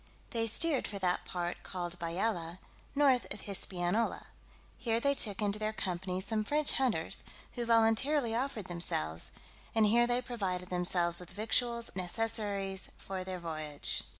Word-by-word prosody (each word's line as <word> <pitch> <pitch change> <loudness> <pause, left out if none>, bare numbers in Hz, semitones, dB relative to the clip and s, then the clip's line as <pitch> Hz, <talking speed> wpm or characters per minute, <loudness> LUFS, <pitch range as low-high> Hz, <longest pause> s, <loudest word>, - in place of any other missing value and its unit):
They 230 -2 0
steered 285 +5 +2
for 205 - -5
that 180 -2 0
part 175 -1 -3
called 175 -1 -4
Bayala, 170 0 -1 0.4
north 275 -4 +3
of 210 - -2
Hispaniola: 195 +2 0 0.5
here 230 -1 +1
they 280 +3 +3
took 215 -6 +2
into 205 0 0
their 215 0 -1
company 185 -2 -2
some 215 +2 +1
French 295 +6 +2
hunters, 260 -4 0 0.3
who 240 -2 -4
voluntarily 230 +3 +3
offered 235 -4 -2
themselves, 85 - +1 0.5
and 220 -1 +5
here 235 +3 +5
they 245 0 +2
provided 190 -7 -3
themselves 175 -1 +2
with 180 -1 -9
victuals 235 +4 +1
and - - -11
necessaries 200 0 -1
for 190 -1 -5
their 185 0 -4
voyage. 155 -4 -1
205 Hz, 150 wpm, -33 LUFS, 180-230 Hz, 0.5 s, and